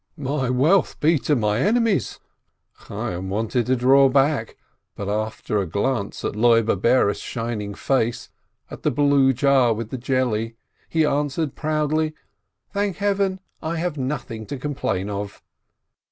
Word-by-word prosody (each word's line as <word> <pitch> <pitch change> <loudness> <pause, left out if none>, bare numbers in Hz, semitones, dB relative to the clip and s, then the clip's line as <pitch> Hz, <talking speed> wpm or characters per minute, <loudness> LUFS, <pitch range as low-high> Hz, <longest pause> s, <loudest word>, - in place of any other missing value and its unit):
"My 140 -2 -2
wealth 150 +10 +2
be 160 0 +3
to 150 - +1
my 105 -3 +1
enemies!" 210 - +1 0.7
Chayyim 90 +2 -4
wanted 110 +4 -1
to 130 - +3
draw 135 +2 +5
back, 135 -3 +1 0.4
but 100 - -5
after 105 0 -2
a 95 - -1
glance 100 +4 -2
at - - -2
Loibe 115 -3 +3
Bares' 115 -3 +3
shining 115 -4 -4
face, 120 -4 -1 0.4
at - - -8
the - - +1
blue 140 -2 +3
jar 130 -2 +3
with 115 0 -6
the 130 - -4
jelly, 120 -3 -1 0.3
he 160 -1 +2
answered 145 0 -1
proudly: 155 0 -1 0.6
"Thank 200 -2 -1
Heaven, 195 -2 0 0.2
I 160 +2 -3
have 170 -1 -2
nothing 130 -5 -4
to 140 - -5
complain 125 -9 -2
of 100 0 -5
130 Hz, 140 wpm, -23 LUFS, 110-150 Hz, 0.7 s, draw